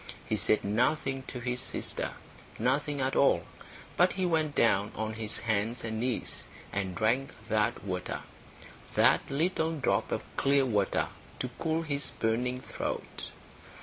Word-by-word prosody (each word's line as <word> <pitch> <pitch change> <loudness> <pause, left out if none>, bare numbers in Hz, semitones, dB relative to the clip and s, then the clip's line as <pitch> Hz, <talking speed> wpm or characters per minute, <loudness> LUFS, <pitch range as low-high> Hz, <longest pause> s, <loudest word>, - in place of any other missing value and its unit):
He 110 - +1
said 105 +1 +2
nothing 130 +6 +1
to 125 - -5
his 125 +1 -1
sister, - - -2 0.4
nothing 140 +4 +1
at 130 +1 +1
all. 140 - +5 0.5
But 180 +1 +5
he 185 0 0
went 160 -4 +1
down 105 -3 +4
on 110 0 -2
his 110 0 -2
hands 110 +2 0
and 110 -1 -2
knees 125 0 -2 0.3
and 95 -2 -1
drank 120 +5 +1 0.2
that 105 -3 +1
water, 90 -2 -3 0.7
that - - +6
little 160 +2 +1
drop 140 - +1
of - - -1
clear 140 0 +4
water, 105 -6 +1 0.3
to 125 - -3
cool 160 0 +1
his 140 -3 -1
burning 125 +3 +1
throat. - - -4
125 Hz, 145 wpm, -30 LUFS, 110-140 Hz, 0.7 s, that